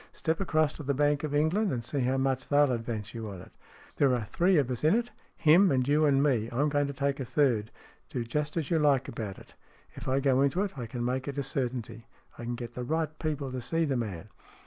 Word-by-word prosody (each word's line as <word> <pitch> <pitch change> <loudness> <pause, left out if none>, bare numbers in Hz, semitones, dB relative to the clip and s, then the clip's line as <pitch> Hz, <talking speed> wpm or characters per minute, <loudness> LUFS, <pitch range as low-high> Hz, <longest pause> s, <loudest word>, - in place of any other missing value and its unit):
Step 160 0 -1
across 155 -5 +1
to - - -8
the 140 -1 -1
Bank 145 +1 +2
of 150 -1 -2
England, 175 +7 +2
and 120 -2 -3
see 140 - -2
how 130 +1 +1
much 135 -1 -1
they'll 145 -1 +4
advance 115 -3 -4
you 115 -2 -5
on 95 -3 -8
it. - - -13 0.5
There 135 -3 +4
are 120 - -2
three 175 - +2
of 135 -4 +1
us 125 - -4
in 155 +6 +5
it. 240 +1 -1 0.3
Him 175 +5 +6
and 130 -2 +1
you 150 +1 +4
and 140 -1 +3
me. 120 -6 +1
I'm 140 +5 +1
going 145 -1 +1
to 140 - -4
take 140 +1 -1
a - - -2
third. 120 -5 +1 0.4
Do 125 - -3
just 150 +7 -2
as 160 -2 -2
you 165 - +3
like 140 -4 +3
about 105 -4 -5
it. - - -15 0.4
If - - -9
I 130 +1 +2
go 135 -1 +3
into 140 +8 +2
it 200 - -4
I 120 -4 -5
can 120 +1 -4
make 130 +2 -2
it 140 0 -4
a 140 - 0
certainty. 120 -4 -3 0.3
I 120 - -8
can 120 +1 -2
get 120 -1 -6
the 125 - -5
right 155 +3 -2
people 145 -4 -2
to 130 -1 -4
see 165 +6 0
the 140 -3 0
man." 105 -5 -4
135 Hz, 255 wpm, -29 LUFS, 120-150 Hz, 0.5 s, Him